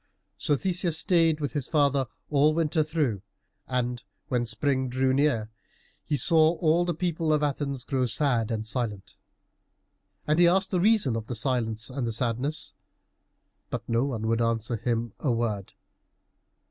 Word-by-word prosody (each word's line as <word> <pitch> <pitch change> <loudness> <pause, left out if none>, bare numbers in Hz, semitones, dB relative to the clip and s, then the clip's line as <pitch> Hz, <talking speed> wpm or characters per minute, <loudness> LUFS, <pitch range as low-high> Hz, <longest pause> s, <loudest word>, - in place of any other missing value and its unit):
So 145 - +1
Theseus 175 +1 0
stayed 165 -2 +3
with 145 -2 -3
his 145 -4 -2
father 140 -4 +2 0.2
all 145 0 +4
the - - -5
winter 160 -1 +1
through, 150 - -1 0.5
and 125 -1 -2 0.3
when 125 -2 0
spring 130 +3 0
drew 130 +1 +1
near, 130 -6 +1 0.5
he 145 - -1
saw 160 +5 +4
all 170 +1 +2
the 175 - -1
people 165 -2 -1
of 150 -1 +2
Athens 140 -2 -2
grow 130 -3 0
sad 120 -3 +1
and 110 -2 -2
silent. 110 -4 -3 1.1
And 155 +2 +1
he 175 - +7
asked 190 +2 +2
the 185 - +1
reason 195 - +3
of 110 -1 -4
the 120 - -4
silence 115 -1 -1
and 125 -2 -3
the 115 - -1
sadness, 125 +6 -1 1.0
but - - -5
no 115 +3 +1
one 115 -6 -3
would 115 +1 +1
answer 115 +1 0
him 115 -1 -2
a 140 - 0
word. 110 -4 -2
135 Hz, 160 wpm, -27 LUFS, 115-155 Hz, 1.1 s, he